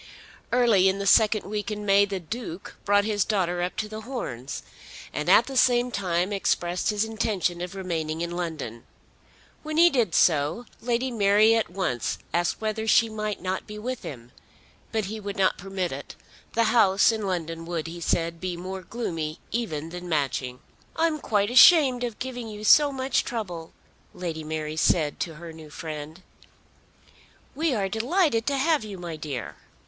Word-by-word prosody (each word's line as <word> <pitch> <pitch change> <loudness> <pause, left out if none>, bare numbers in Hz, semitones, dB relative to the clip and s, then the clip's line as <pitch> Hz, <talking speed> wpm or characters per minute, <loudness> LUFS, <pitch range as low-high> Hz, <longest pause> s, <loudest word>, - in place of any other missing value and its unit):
Early 225 -6 +4
in 190 - -1
the 200 - -3
second 215 +2 +4
week 210 0 -3
in 210 -1 -4
May 200 0 +5
the 195 -1 -4
Duke 190 0 -7
brought 205 0 +3
his 210 -2 +1
daughter 180 -4 0
up 180 +1 -2
to 215 - -2
The 215 +1 -7
Horns, 210 - -5 0.5
and 150 +3 -2
at 215 +5 +7
the 270 - -7
same 245 -1 +3
time 185 -2 -1
expressed 175 -2 0
his 210 0 +1
intention 210 -6 -1
of 180 +2 -5
remaining 165 -4 -3
in 170 0 -2
London. 160 -10 -5 0.8
When 310 0 -4
he 340 +1 +7
did 230 -10 +1
so 160 +8 +2 0.2
Lady 245 +2 0
Mary 210 0 +4
at 225 -1 +1
once 175 - -2 0.2
asked 175 0 0
whether 220 0 -2
she 225 +1 +5
might 215 -3 -4
not 185 0 -3
be 210 - -8
with 250 +3 -4
him, 120 -3 -9 0.6
but 220 -2 -1
he 215 +3 -5
would 200 -1 -6
not 190 -1 +2
permit 190 -1 -3
it. 135 +2 -7 0.4
The 230 - +3
house 200 -3 +5
in 220 -3 -3
London 165 -3 -3
would, 170 -2 -3
he 170 +1 -7
said, 165 0 -1
be 180 -2 -3
more 185 +2 -6
gloomy 165 -6 -4
even 165 -10 -3
than 180 +1 -7
Matching. 135 -5 -1 0.3
"I 325 - +2
am 315 -2 0
quite 205 -4 0
ashamed 260 -2 +7
of 235 -3 -3
giving 245 -2 -5
you 210 -1 -8
so 290 +6 +6
much 265 0 0
trouble," 180 -9 -5 0.4
Lady 165 -3 -4
Mary 155 0 -4
said 155 -2 +2
to 165 -2 -3
her 165 +1 -9
new 160 -1 -12
friend. 155 +3 -7 1.3
"We 305 -1 0
are 200 -3 0
delighted 230 - +1
to 280 -1 +1
have 305 +1 +2
you, 205 -3 -7
my 170 -2 -6
dear." 150 -5 -6
195 Hz, 175 wpm, -26 LUFS, 170-225 Hz, 1.3 s, at